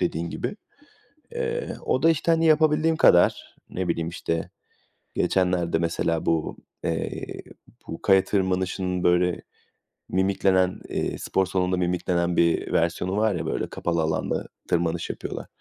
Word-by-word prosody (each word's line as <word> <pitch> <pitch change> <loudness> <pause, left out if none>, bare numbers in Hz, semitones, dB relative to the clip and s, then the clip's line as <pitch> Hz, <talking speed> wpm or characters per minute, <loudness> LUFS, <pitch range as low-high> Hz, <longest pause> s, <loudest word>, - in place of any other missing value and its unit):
dediğin 85 -1 -1
gibi. 205 - -4 0.8
Eee, 475 0 -2 0.2
o 130 - 0
da 165 - +6
işte, 165 +1 +2
hani, 165 0 +3
yapabildiğim 155 +1 +3
kadar. 90 - +4
Ne 95 0 -3
bileyim 85 -1 -1
işte 85 -1 -3 0.7
geçenlerde 90 -3 +1
mesela 85 -1 -1
bu, 80 -2 0 0.3
eee, - - -2 0.6
bu 80 - -7
kaya 95 -1 +5
tırmanışının 95 -1 -1
böyle 90 0 +2 0.7
mimiklenen, 95 -1 +2
eee, - - -2
spor 95 - 0
salonunda 90 0 0
mimiklenen 90 -1 0
bir 85 -1 +2
versiyonu 90 +3 0
var 110 -3 +2
ya - - -3
böyle - - -2
kapalı 85 -1 -1
alanda 80 0 -1 0.2
tırmanış 85 -1 0
yapıyorlar. - - -6
90 Hz, 130 wpm, -25 LUFS, 85-100 Hz, 0.8 s, da